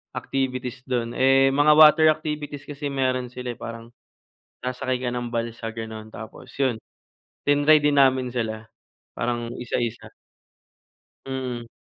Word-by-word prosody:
activities 130 -1 -3
dun. 120 -2 -1
Eh, 135 +1 +4
mga 145 +2 +4
water 155 0 +8
activities 150 -2 -5
kasi 145 0 -6
meron 130 -2 0
sila 125 0 -5
parang 115 0 -8 0.7
sasakay 125 0 -2
ka 130 - -2
ng 120 -1 -3
balsa 115 -1 -3
gano'n 110 -1 -7
tapos 115 +3 -10
yun 130 -4 +2 0.7
tinry 145 +2 +5
din 150 0 +3
namin 130 -2 +4
sila 110 -2 -3 0.5
parang 120 -1 -2
isa, 120 -1 -3
isa. 120 0 -5 1.2
Mm. 125 -3 -4
125 Hz, 125 wpm, -24 LUFS, 120-135 Hz, 1.2 s, water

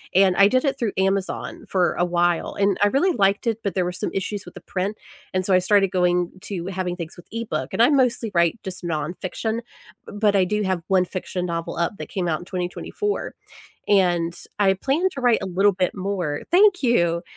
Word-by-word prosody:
and 190 -1 +5
I 200 - +7
did 255 +6 +2
it 275 -1 0
through 230 -5 0
Amazon 195 0 -1
for 180 -2 +2
a - - +1
while, 175 -1 0
and 200 -1 +2
I 205 - +6
really 285 - +2
liked 200 -4 +2
it, 225 -1 0
but 200 -4 -2
there 185 -2 +1
were 180 - -1
some 180 - -3
issues 195 +1 -3
with - - -12
the - - -8
print, 195 +3 -3 0.4
and 185 0 +1
so 195 - +2
I 185 - +6
started 195 0 +3
going 180 -1 +1
to 180 -4 -5
having 185 -2 -3
things 170 -2 -7
with 175 - -15
e-book, 230 0 -3
and - - +1
I 245 - +6
mostly 250 -5 +2
write, 170 +4 +2
just, 190 -1 -7
nonfiction, 175 +7 -3 0.5
but 205 0 +1
I 190 -2 +4
do 210 +3 -1
have 185 -3 -1
one 185 -1 +3
fiction 180 0 -4
novel 170 -1 -4
up 170 +4 -1
that - - -7
came 185 -3 -2
out 155 -2 0
in 175 - -11
2024, 185 - -3 0.5
and 175 -4 +2 0.2
I 195 -2 +4
plan 275 - +1
to 275 - -6
write 240 -2 +4
a - - -3
little 195 +3 +3
bit 185 -1 -1
more. 185 -6 -2
Thank 380 0 +5
you. 170 -9 +2
190 Hz, 215 wpm, -23 LUFS, 180-210 Hz, 0.5 s, I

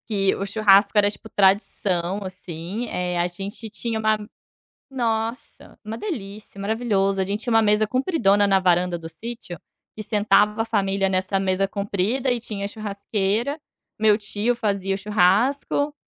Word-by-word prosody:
Que 195 -3 +1
o 195 - -3
churrasco 200 0 +4
era, 205 0 +5
tipo, 220 +2 -11
tradição, 190 -2 +1
assim, 185 +4 -6
eh, 180 -1 -2
a 175 - +2
gente 200 +5 -7
tinha 220 +1 -3
uma 215 0 +2 0.7
nossa. 230 -2 -3
Uma 220 +2 -5
delícia, 210 - -7
maravilhoso, 200 -2 0
a - - +2
gente 200 +2 -3
tinha 240 - -1
uma 225 0 +5
mesa 210 0 +3
compridona 235 - +2
na 195 -1 +3
varanda 180 -1 +2
do 165 -1 -8
sítio, 200 +1 -8 0.4
que 215 - -5
sentava 210 0 +2
a - - -3
família 195 -3 0
nessa 190 +1 0
mesa 195 0 +1
comprida 205 +6 -1
e 245 -1 0
tinha 205 -3 -5
churrasqueira, 210 +5 -2 0.4
meu 215 -1 +4
tio 210 +3 -1
fazia 200 -4 -1
o - - -3
churrasco, 215 +9 +2
205 Hz, 155 wpm, -23 LUFS, 195-225 Hz, 0.7 s, era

